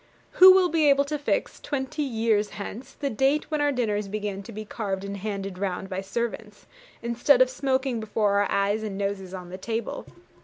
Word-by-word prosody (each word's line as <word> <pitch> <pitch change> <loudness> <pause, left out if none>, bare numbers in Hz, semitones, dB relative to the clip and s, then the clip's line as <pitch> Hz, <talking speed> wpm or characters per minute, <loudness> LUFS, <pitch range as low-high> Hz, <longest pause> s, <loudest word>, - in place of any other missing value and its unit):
Who 375 +1 +9
will 370 -1 +4
be 315 -3 +3
able 280 0 +4
to 300 +1 -3
fix, 290 - -1
twenty 280 +1 -3
years 225 -5 +1
hence, 235 +6 -7
the 280 -2 -3
date 275 +6 +1
when 305 -1 0
our 290 0 +3
dinners 210 -6 -1
began 205 -1 -4
to 215 - -10
be 215 0 -7
carved 195 -3 -4
and 200 0 -5
handed 195 -2 -5
round 190 -1 -3
by 190 0 -3
servants, 215 +1 -5 0.4
instead 240 +3 +3
of 255 0 +5
smoking 260 -2 0
before 210 -2 +1
our 205 - 0
eyes 200 +2 +1
and 210 -3 -4
noses 195 -2 -3
on 180 -1 -9
the 185 - -7
table? 225 +3 -4
220 Hz, 195 wpm, -26 LUFS, 200-270 Hz, 0.4 s, Who